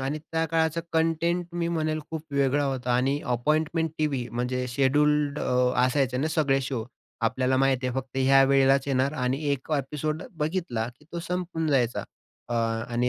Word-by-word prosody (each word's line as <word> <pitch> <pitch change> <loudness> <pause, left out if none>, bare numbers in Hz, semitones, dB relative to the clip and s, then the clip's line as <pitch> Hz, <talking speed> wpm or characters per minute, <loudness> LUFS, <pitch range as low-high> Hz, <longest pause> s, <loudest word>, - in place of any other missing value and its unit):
आणि 135 +3 -2
त्या 160 +1 -2
काळाचा 160 +1 +1
कंटेंट 165 +2 +1
मी 170 -1 -1
म्हणेल 155 -2 -1
खूप 160 -2 -4
वेगळा 140 +1 +2
होता 130 -2 -1
आणि 135 +3 +1 0.2
अपॉइंटमेंट 155 +5 0
टीव्ही 135 -6 -1
म्हणजे 125 +1 -2
शेड्यूल्ड 145 +3 +2
अ, 125 0 +1
असायचे 130 -1 +1
ना, 150 +5 0
सगळे 145 -4 +2
शो 130 -4 -3 0.4
आपल्याला 130 +3 +1
माहिती 135 -1 +2
आहे 125 - -2
फक्त 130 0 -8
ह्या 135 +1 +5
वेळेलाच 135 0 +4
येणार 135 +2 +1
आणि 130 +1 -1
1 140 +2 -3
ॲपिसोड 150 +2 -2 0.2
बघितला 150 -8 -1
की 150 - -22
तो 170 - -3
संपून 175 -2 -3
जायचा. 125 -5 +1 0.5
अ, 120 - -2 0.4
आणि 120 +1 +1
140 Hz, 165 wpm, -26 LUFS, 130-155 Hz, 0.5 s, ह्या